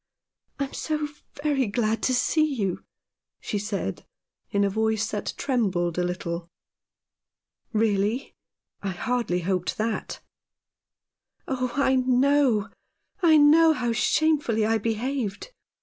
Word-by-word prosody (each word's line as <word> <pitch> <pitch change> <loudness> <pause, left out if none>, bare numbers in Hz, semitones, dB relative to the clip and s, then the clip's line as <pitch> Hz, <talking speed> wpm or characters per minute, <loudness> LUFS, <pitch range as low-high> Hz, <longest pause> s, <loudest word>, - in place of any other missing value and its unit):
" - - -47
I - - +1
am 270 - -6
so 305 -1 -2 0.3
very 280 -5 +1
glad 220 +1 0
to - - +1
see 310 +5 +2
you," 195 -6 -2 0.6
she 210 - -3
said 200 - -3 0.5
in 200 0 +1
a - - +3
voice 220 +1 0
that 210 - -3
trembled 185 - 0
a - - +2
little. 175 -1 -4 0.6
" - - -65
Really? 215 +2 0 0.5
I 200 - -2
hardly 230 -2 -1
hoped 180 0 -1
that." 220 0 -2 0.6
" - - -52
Oh, 255 -2 -2
I 265 -2 +3
know, 255 -3 +3 0.5
I 325 -3 +6
know 315 +2 +6
how 245 -5 -1
shamefully 245 -3 +2
I 225 +1 +2
behaved. 230 - -3
225 Hz, 130 wpm, -25 LUFS, 200-270 Hz, 0.6 s, I